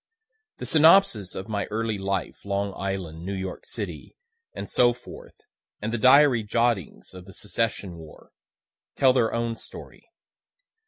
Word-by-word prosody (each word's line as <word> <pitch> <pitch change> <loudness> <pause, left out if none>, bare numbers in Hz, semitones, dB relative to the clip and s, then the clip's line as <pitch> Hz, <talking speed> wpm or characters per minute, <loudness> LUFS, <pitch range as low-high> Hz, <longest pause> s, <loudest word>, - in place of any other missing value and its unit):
The - - -6
synopsis 160 - +4
of 95 - -6
my 105 -2 -2
early 110 -1 -2
life, 95 -1 -3
Long 100 0 -2
Island, 95 -5 -4
New 100 +2 -4
York 95 -1 -6
city, - - -7 0.4
and - - -7
so 120 -1 +3
forth, 125 - -13 0.4
and 110 +2 -4
the 120 - -1
diary 130 0 +6
jottings 115 - -1
in 90 -1 -10
the 95 -2 -13
Secession 100 -3 -3
war, 80 -2 -14 0.6
tell 130 -2 +4
their 120 -3 +2
own 115 0 -2
story. - - -11
105 Hz, 145 wpm, -25 LUFS, 95-120 Hz, 0.6 s, diary